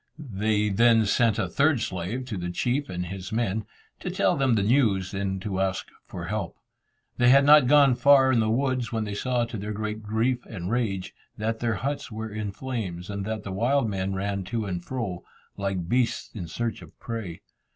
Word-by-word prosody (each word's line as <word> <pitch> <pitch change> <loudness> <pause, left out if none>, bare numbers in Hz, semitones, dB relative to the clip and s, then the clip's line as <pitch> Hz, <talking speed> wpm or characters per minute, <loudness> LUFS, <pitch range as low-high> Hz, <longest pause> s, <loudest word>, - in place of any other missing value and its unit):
They 105 -6 0
then 115 +2 +4
sent 110 +1 +2
a - - 0
third 145 -2 +2
slave 100 +5 -3
to 120 -4 -5
the 90 0 -3
chief 125 +10 -1
and 90 0 -3
his 95 +1 -7
men, 110 -2 -1 0.3
to - - -4
tell - - +2
them 135 -4 +2
the 100 - +1
news, 105 -6 +2
and 95 -1 -2
to 95 -3 -2
ask 95 -1 -1 0.2
for 85 - -6
help. 100 -1 -3 0.6
They 120 0 +5
had 140 +2 +6
not 150 -3 +7
gone 140 -1 +6
far 130 +1 +5
in 120 - +3
the 110 -1 +2
woods, 130 +1 0
when 110 -2 -1
they 105 -1 -4
saw, 120 +3 0
to 115 -1 -6
their 105 +2 -4
great 110 +1 -4
grief 115 +4 0
and 95 -2 -5
rage, 105 -6 -1 0.2
that 110 +1 -2
their 115 -2 0
huts 140 -1 -3
were 110 0 -5
in 105 -1 -3
flames, 100 -6 -5
and 100 -1 -4
that 110 0 -3
the 100 - -6
wild 120 +6 +1
men 95 -1 -2
ran 100 0 -2
to 115 +2 -2
and 90 -3 -4
fro, 110 -9 -4 0.3
like 95 -3 -2
beasts 125 +4 0
in 90 -6 -6
search 115 +7 -3
of - - -15
prey. 110 -8 -6
110 Hz, 205 wpm, -26 LUFS, 95-125 Hz, 0.6 s, not